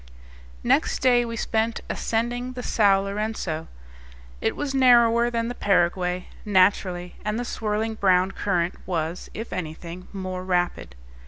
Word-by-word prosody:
Next - - +2
day 245 -2 +3
we 230 0 -5
spent 225 0 -1
ascending 240 +2 -2
the 250 -1 -6
Sao 200 -5 +3
Lourenco. 200 -5 -3 0.7
It - - 0
was 290 -2 -3
narrower 240 -3 +5
than 230 -1 -1
the 245 - -3
Paraguay, 180 -3 +1 0.2
naturally, 185 -2 +2
and 210 +2 -1
the 245 - -3
swirling 220 0 -2
brown 190 -3 +3
current 180 -3 0
was, 165 -1 -3
if 225 +2 -6
anything, 170 +1 -6
more 185 -2 -5
rapid. 175 - -1
200 Hz, 135 wpm, -24 LUFS, 180-230 Hz, 0.7 s, narrower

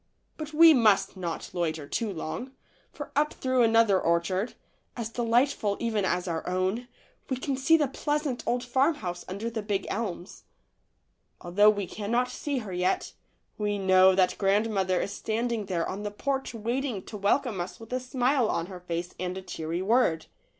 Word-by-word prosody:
But 310 -1 -6
we 325 +1 +8
must 220 -7 +3
not 175 -3 -5
loiter 160 -4 -2
too 220 +7 -2
long, 195 +10 -5 0.4
for - - -8
up 300 +1 +2
through 260 -1 +1
another 225 -4 +4
orchard, 170 +6 0 0.4
as 230 -2 -3
delightful 230 -2 +1
even 220 -4 0
as 180 0 0
our 165 -2 -2
own, 185 +7 -1 0.4
we 260 - -1
can 270 +1 -2
see 270 +5 +4
the 295 -3 +1
pleasant 295 -1 -2
old 245 0 0
farmhouse 255 - 0
under 200 +5 -4
the 230 -1 -3
big 205 -2 -2
elms. 195 -5 -5 0.9
Although 205 +5 +4
we 205 -2 0
cannot 235 +6 -1
see 285 -2 -3
her 190 - -6
yet, 180 +1 0 0.5
we 205 -1 0
know 190 -1 +5
that 185 -1 +2
grandmother 195 -2 +2
is 200 - -3
standing 225 -1 -2
there 175 -3 -1
on 195 - -4
the 210 - -3
porch 265 +4 -3
waiting 235 -1 -2
to - - -9
welcome 210 0 +1
us 175 0 -6
with 225 +2 -9
a 255 - +1
smile 255 -1 +1
on 165 - -1
her 185 0 -9
face 175 0 -4
and 185 +1 -3
a 190 - -7
cheery 165 +1 -4
word. 195 -7 +2
210 Hz, 170 wpm, -28 LUFS, 185-250 Hz, 0.9 s, we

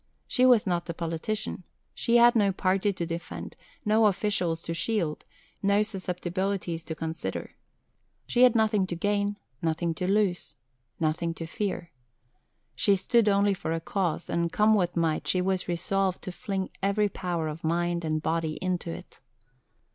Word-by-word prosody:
She 255 -1 +4
was 245 -4 +5
not 175 -2 -1
a 170 - -3
politician. 170 +6 -3 0.3
She 235 +1 +2
had 240 0 +7
no 205 -3 +4
party 195 +2 +1
to 175 -3 -3
defend, 170 0 -6 0.3
no 215 +1 +5
officials 180 -5 0
to 165 - -3
shield, 165 -3 -1 0.4
no 200 +1 +3
susceptibilities 185 -3 -3
to 160 - -5
consider. 160 0 -4 0.7
She 245 - +1
had 250 -2 +7
nothing 215 -4 +3
to 175 - -3
gain, 205 +3 0 0.2
nothing 165 +1 0
to 180 +4 -1
lose, 200 -4 +1 0.4
nothing 165 +1 0
to 165 - -5
fear. 175 -1 -3 0.8
She 200 - +4
stood 220 +3 +3
only 200 0 +3
for 165 -3 -3
a 165 - -1
cause; 175 0 -2
and, 170 0 0
come 215 +1 +4
what 180 -4 +1
might, 160 -2 0
she 185 - +2
was 185 0 0
resolved 185 +2 0
to 185 - -5
fling 190 +1 -3
every 200 +2 +2
power 175 -5 -3
of 155 +2 -6
mind 170 +1 0
and 155 -1 -1
body 160 -1 0
into 180 +1 -2
it. - - -9
185 Hz, 160 wpm, -28 LUFS, 165-205 Hz, 0.8 s, had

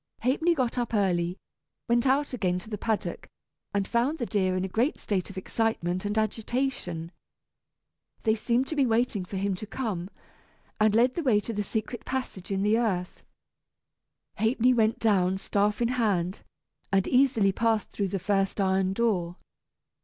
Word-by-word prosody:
Ha'penny 320 +7 +2
got 255 -3 0
up 235 -1 -1
early, 180 -3 +1 0.5
went 240 +2 +2
out 275 +2 +2
again 185 -7 0
to 215 +5 -9
the 210 - -2
paddock, 220 -1 -2 0.4
and 200 -1 0
found 245 +7 +1
the 240 - -2
deer 185 -4 0
in 185 - -1
a 190 - -8
great 245 +7 +2
state 195 -3 -2
of 195 - -10
excitement 190 -3 -1
and 205 +1 -1
agitation. 215 -6 -2 1.1
They 220 - +3
seemed 235 +3 +1
to 315 - -3
be 275 -3 +3
waiting 225 -4 +1
for 195 - -5
him 195 +1 0
to 195 +3 -6
come, 205 -7 -3 0.7
and 215 0 +4
led 245 +3 +4
the 340 - -2
way 245 -9 +3
to 230 - -5
the 210 - -1
secret 220 +3 -4
passage 255 -8 -4
in 195 -1 0
the 215 +2 +3
earth. 185 -6 -2 1.2
Ha'penny 240 +3 +3
went 225 -2 +2
down, 190 -4 +2
staff 205 +3 0
in 235 - +1
hand, 205 -7 0 0.5
and 195 -1 +2
easily 250 -6 +4
passed 225 +1 0
through 200 - -1
the 195 - -2
first 195 +2 0
iron 190 -1 +2
door. 195 -6 0
215 Hz, 170 wpm, -27 LUFS, 190-240 Hz, 1.2 s, and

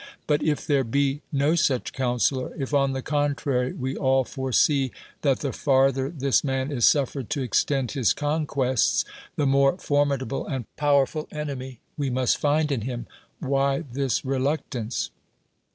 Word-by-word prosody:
But 150 0 +1
if 150 -2 0
there 140 -4 +2
ho 140 +4 0
no 145 +2 +2
such 140 -7 +1
counselor; 130 0 0
if, 135 +1 -4
on 135 -1 +3
the 130 -1 -4
contrary, 145 -3 0
we 130 +1 -3
all 130 0 +2
foresee 130 +1 +1 0.3
that 140 -3 +1
the 140 -3 -2
farther 135 -1 +2
this 140 -4 +1
man 135 0 -1
is 120 -5 +2
suffercni 135 -3 +2
to 140 -5 -2
exlc'ud 135 +1 +1
his 130 -7 +2
conquests, 145 -4 +1 0.3
the 145 - 0
more 135 +3 +3
formidable 140 -5 0
and 130 -5 -3
powerful 145 +1 +1
enemy 135 -5 -5 0.2
we 140 -2 -1
must 125 0 +1
find 150 +1 +2
in 130 -5 0
him, 120 +1 -4 0.4
whj' 140 0 0
this 135 0 -1
reluctance? 130 -3 -2
135 Hz, 150 wpm, -25 LUFS, 130-145 Hz, 0.4 s, on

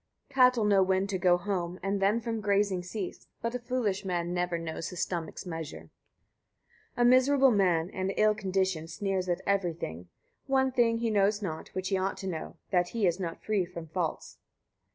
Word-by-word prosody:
21. 260 -1 +5
Cattle 240 -4 -1
know 200 -2 +5
when 190 0 +2
to 195 -2 -2
go 175 -1 +4
home, 180 -1 -3
and 195 0 -1
then 205 +4 +3
from 230 -1 -3
grazing 200 -2 +1
cease; 180 +2 -6
but 230 +1 -3
a 250 - -2
foolish 240 -5 -1
man 175 -2 -2
never 180 -1 0
knows 165 -1 -4
his 180 - -7
stomach's 170 +1 -3
measure. 165 -3 -7 1.0
22. - - -1
A - - +5
miserable 260 +2 +5
man, 180 -4 +2
and 190 +1 -2
ill 215 0 +5
conditioned, 190 -5 -1
sneers 190 0 -2
at 175 - 0
every 195 -4 +1
thing: 85 - -7 0.4
one 265 -1 +2
thing 235 -2 +3
he 230 -1 -1
knows 205 0 +2
not, 160 -4 -4
which 185 0 -2
he 195 -2 +1
ought 190 +1 -1
to - - -7
know, 165 -4 -4 0.2
that 180 -2 +3
he 225 -3 0
is 175 +1 +1
not 170 -3 -5
free 210 -3 +1
from 170 -2 -8
faults. 165 -1 -3
190 Hz, 195 wpm, -29 LUFS, 175-215 Hz, 1.0 s, 21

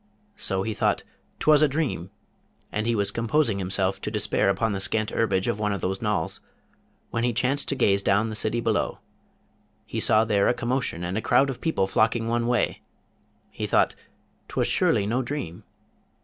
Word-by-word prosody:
So 95 -1 -1
he 110 - -2
thought, - - 0 0.4
''Twas 150 -1 +5
a 155 - +6
dream!' 140 - -2 0.6
and 110 +1 -2
he 115 - +2
was 100 -2 0
composing 115 -2 +1
himself 95 0 -1
to - - -3
despair - - +1
upon 105 +3 +1
the 100 - -2
scant 110 +2 -1
herbage 95 -4 +1
of 105 - -1
one 105 -1 0
of 100 - -4
those 95 +1 -2
knolls, 105 -7 -1 0.7
when 115 - -1
as - - +3
he 120 - 0
chanced 130 +4 0
to 140 - 0
gaze 100 -6 +3
down 100 +3 +2
the 110 - -5
city 110 +2 +1
below, 110 -3 0 0.9
he - - -4
saw 110 +1 +4
there 100 -3 +2
a 120 - +2
commotion 120 -7 -2
and 90 +5 -2
a - - -5
crowd 130 +5 +3
of 125 - -9
people 160 -12 +1
flocking 115 +4 +1
one 115 0 0
way; 120 0 0 0.7
he - - -4
thought, - - +3 0.5
''Twas - - 0
surely 100 - +2
no 120 +5 0
dream? 125 - -5
110 Hz, 190 wpm, -25 LUFS, 100-120 Hz, 0.9 s, a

